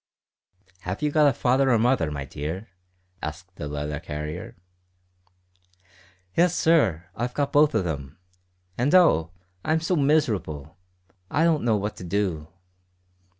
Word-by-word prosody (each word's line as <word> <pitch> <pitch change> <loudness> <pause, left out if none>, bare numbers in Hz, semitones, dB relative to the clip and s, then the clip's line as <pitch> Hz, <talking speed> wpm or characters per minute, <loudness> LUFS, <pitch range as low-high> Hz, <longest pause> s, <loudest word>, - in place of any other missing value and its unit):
"Have 90 +7 -5
you 150 - +1
got 150 0 +5
a - - +2
father 130 +2 +2
or 120 - +4
mother, 115 -8 +2
my 70 -2 -5
dear?" 80 - -5 0.5
asked 90 +5 -7
the 75 - -5
letter 75 0 -4
carrier. 75 +3 -6 1.8
"Yes, 175 +1 +3
sir; 95 - +3
I've 125 +2 -3
got 140 -1 -1
both 145 -3 +4
of 100 -5 +1
'em. 70 -4 -5 0.6
And 140 +8 +3
oh! 85 - +5 0.3
I'm 155 +1 +1
so 170 +3 0
miserable. 110 - 0 0.5
I 155 - +1
don't 165 -3 +3
know 115 -2 +3
what 105 +1 -4
to - - -8
do." 90 -4 -1
105 Hz, 140 wpm, -25 LUFS, -, 1.8 s, got